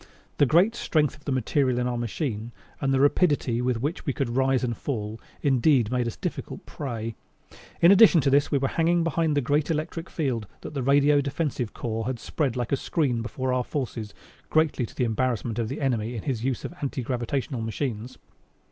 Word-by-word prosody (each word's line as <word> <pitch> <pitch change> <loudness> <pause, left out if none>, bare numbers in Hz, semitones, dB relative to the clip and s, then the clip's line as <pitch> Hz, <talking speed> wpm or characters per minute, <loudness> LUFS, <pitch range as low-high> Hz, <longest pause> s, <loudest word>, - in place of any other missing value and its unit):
The 145 - +4
great 180 - +4
strength 155 - +1
of 145 - -21
the 145 - -2
material 130 0 +1
in 125 - 0
our 125 0 -1
machine, 120 -1 -3 0.3
and 135 - +1
the 135 - +2
rapidity 145 -4 +2
with 125 -1 -1
which 155 +5 -2
we 140 - -1
could 125 -3 -2
rise 130 -1 +2
and 120 -2 -1
fall, 110 -5 -4 0.2
indeed 130 -4 +3
made 125 -1 0
us 115 - -4
difficult - - -5
prey. 115 -5 -5 0.7
In 170 - +9
addition 200 -3 +7
to 135 - +2
this 145 +1 +4
we 140 - +2
were 135 0 +1
hanging 170 +3 +2
behind 160 -1 +1
the - - +3
great 145 +4 +1
electric 165 +2 -3
field 125 - -2
that - - -8
the 140 - -2
Radio 145 +2 +4
Defensive 140 -4 -2
Corps 115 -1 -3
had 130 -1 -2
spread 135 +1 -2
like 120 -1 -3
a 140 - +3
screen 130 -5 0
before 130 +3 -2
our 125 -1 +1
forces, 120 -7 -4 0.3
greatly 155 -6 +2
to - - -16
the - - 0
embarrassment 120 -1 -1
of 115 -2 -1
the 135 - -4
enemy 120 -4 -1
in 110 - -5
the 135 - 0
use 125 +1 -2
of - - -5
his 175 - -16
anti 135 -2 -2
gravitational 125 +1 -2
machines. 115 +1 -4
130 Hz, 205 wpm, -26 LUFS, 120-145 Hz, 0.7 s, In